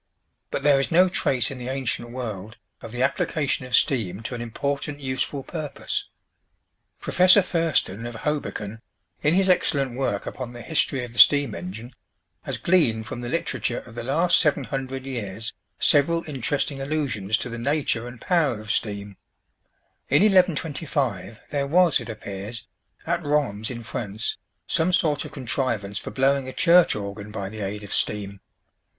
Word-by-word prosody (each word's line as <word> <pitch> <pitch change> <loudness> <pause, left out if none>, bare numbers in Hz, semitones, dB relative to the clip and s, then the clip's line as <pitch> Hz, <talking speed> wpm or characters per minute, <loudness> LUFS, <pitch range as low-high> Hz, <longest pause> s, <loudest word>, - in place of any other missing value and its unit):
But - - -3
there 145 -2 +5
is 135 - 0
no 180 +3 +5
trace 130 -9 0
in 135 - -7
the 125 - -6
ancient 130 -3 -2
world 110 -4 -6 0.2
of 115 - -8
the 125 +2 -1
application 140 -1 0
of 125 - +2
steam 110 -6 +1
to 125 - -4
an 120 - -4
important 140 +5 -3
useful 135 +1 -2
purpose. 155 -3 -4 0.9
Professor 185 +2 +6
Thurston 155 - 0
of 120 - -7
Hoboken, 115 -5 -3 0.4
in 150 +3 +3
his 190 0 +3
excellent 140 -8 +2
work 125 -6 -1
upon 125 -2 -6
the 120 -1 -9
"History 145 -4 0
of 120 - -12
the 120 - -3
Steam 145 -6 +7
Engine," 105 +8 -7 0.5
has - - -3
gleaned 120 -12 +2
from 120 +2 -6
the 120 - -4
literature 125 -5 -1
of 120 - -14
the 120 - -5
last 165 +7 +3
seven 150 -3 +3
hundred 135 0 -4
years 115 -4 -4 0.2
several 165 +3 +4
interesting 140 0 -1
allusions 130 -9 0
to - - -3
the 115 -1 -6
nature 135 -3 0
and 120 -1 -10
power 155 - +1
of 110 0 -4
steam. 100 -2 -2 0.9
In 145 +7 +5
1125 150 - +1
there 140 -2 0
was, 175 +1 +4
it 120 -1 -8
appears, 105 0 -7 0.4
at 170 - -1
Rheims 140 -8 0
in 120 -2 -6
France, 110 -1 -3 0.3
some 175 +3 +1
sort 155 -4 +2
of - - -8
contrivance 115 -6 -2
for - - -7
blowing 135 0 +1
a - - -8
church 175 0 +5
organ 100 0 -6
by 100 -2 -5
the 110 +1 -7
aid 105 +1 -4
of 100 - -6
steam. 100 -1 -1
130 Hz, 165 wpm, -24 LUFS, 110-145 Hz, 0.9 s, Steam